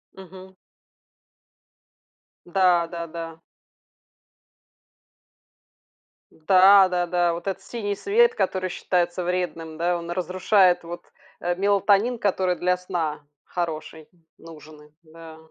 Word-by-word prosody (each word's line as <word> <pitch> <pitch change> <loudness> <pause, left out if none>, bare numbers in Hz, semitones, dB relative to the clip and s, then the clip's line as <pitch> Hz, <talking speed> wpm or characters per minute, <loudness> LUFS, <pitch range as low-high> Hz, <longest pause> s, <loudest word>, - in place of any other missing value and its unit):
Мгм. 190 0 -13 1.9
Да 175 -2 +2
да 170 0 -6
да. 165 0 -8 2.9
Да 190 +3 +5
да 175 -1 -1
да. 175 -1 +1
Вот 170 +3 -7
этот 190 0 -4
синий 205 -3 -4
свет, 465 - +2
который 185 0 -1
считается 175 0 -1
вредным, 175 -3 -4
да, 175 +1 0
он 170 0 -7
разрушает, 185 0 +2
вот, 170 +1 -8 0.4
э, 175 0 -2
мелатонин, 200 +4 +2
который 185 -3 0
для 180 +1 0
сна 165 -4 -4 0.2
хороший, 160 -2 -6 0.3
нужный, 150 -2 -15
да. 160 0 -13
180 Hz, 100 wpm, -23 LUFS, 165-190 Hz, 2.9 s, Да